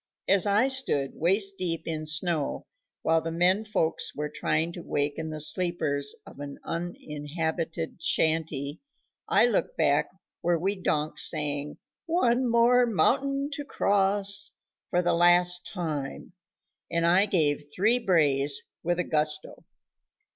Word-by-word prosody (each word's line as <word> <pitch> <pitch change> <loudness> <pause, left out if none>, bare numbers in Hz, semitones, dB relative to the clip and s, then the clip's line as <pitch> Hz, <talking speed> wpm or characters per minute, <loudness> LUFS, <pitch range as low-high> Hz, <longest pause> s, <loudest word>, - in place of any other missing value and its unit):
As 195 +1 +4
I 210 +6 +3
stood 260 - +1
waist 195 +4 +1
deep 165 -3 -2
in 155 -1 -4
snow 155 -1 -1 0.4
while 160 0 +2
the 165 - -4
men 180 +5 +2
folks 210 -7 -1
were 150 +1 -3
trying 160 +2 -1
to 175 - -8
waken 145 +1 -2
the 155 0 -6
sleepers 155 -3 +1
of - - -14
an 145 -1 -7
uninhabited 165 0 -4
shanty, 155 -3 -1 0.5
I - - +5
looked - - -1
back - - +2 0.3
where 175 0 +1
we 195 +5 -1
donks 155 -5 +1
sang 150 -2 -3 0.3
"One 255 -7 +1
More 240 +1 +4
Mountain 275 - 0
to 290 - -4
Cross" 200 -4 +2 0.4
for 180 0 +1
the 175 - +1
last 175 +1 +4
time, 155 -6 -5 0.6
and 170 0 0
I 185 +4 +4
gave 150 -6 +1
three 220 +9 +2
brays 145 - +2 0.2
with 175 +1 -1
a 180 - 0
gusto. 150 -1 -2
170 Hz, 135 wpm, -27 LUFS, 155-195 Hz, 0.6 s, I